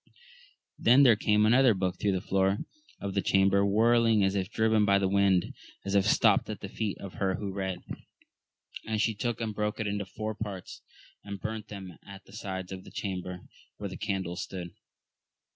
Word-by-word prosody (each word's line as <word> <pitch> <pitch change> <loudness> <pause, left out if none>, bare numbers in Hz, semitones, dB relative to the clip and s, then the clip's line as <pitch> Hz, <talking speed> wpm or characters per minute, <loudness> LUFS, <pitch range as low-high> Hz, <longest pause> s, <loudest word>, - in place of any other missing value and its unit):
Then 125 +5 +6
there 120 -5 +7
came 105 0 +2
another 120 0 +5
book 90 -1 -2
through 100 -2 +1
the 95 - -1
floor 95 +1 +1 0.4
of 100 -1 -4
the 100 - +1
chamber, 95 +1 +3
whirl 115 +4 +4
ing 110 -3 +4
as 95 0 +2
if 95 -2 -1
driven 110 -1 +2
by 100 -1 +4
the 100 -1 +1
wind, 100 -2 +2 0.3
and 100 +1 -1
it 100 - +4
stopt - - +3
at - - -5
the - - -6
feet 105 -3 -3
of 100 -2 -9
her 95 -1 +1
who 100 -1 -5
read, 95 -2 -4 1.0
and 110 -1 -1
she 110 +1 +2
took 115 +2 -3
and 110 -2 -3
broke 105 +1 -2
it 110 - -1
into 100 -1 -2
four 110 +3 -4
parts, 100 -4 -7 0.4
and 100 -1 -7
burnt 110 +1 -5
them 95 -4 -9
at 100 0 -12
the 95 - -17
sides 95 -3 -5
of 95 -1 -7
the - - -12
chamber 90 -2 -5 0.4
where 100 - -5
the 95 - -7
candles 95 -3 -3
stood. 90 -2 -6
100 Hz, 195 wpm, -29 LUFS, 95-110 Hz, 1.0 s, there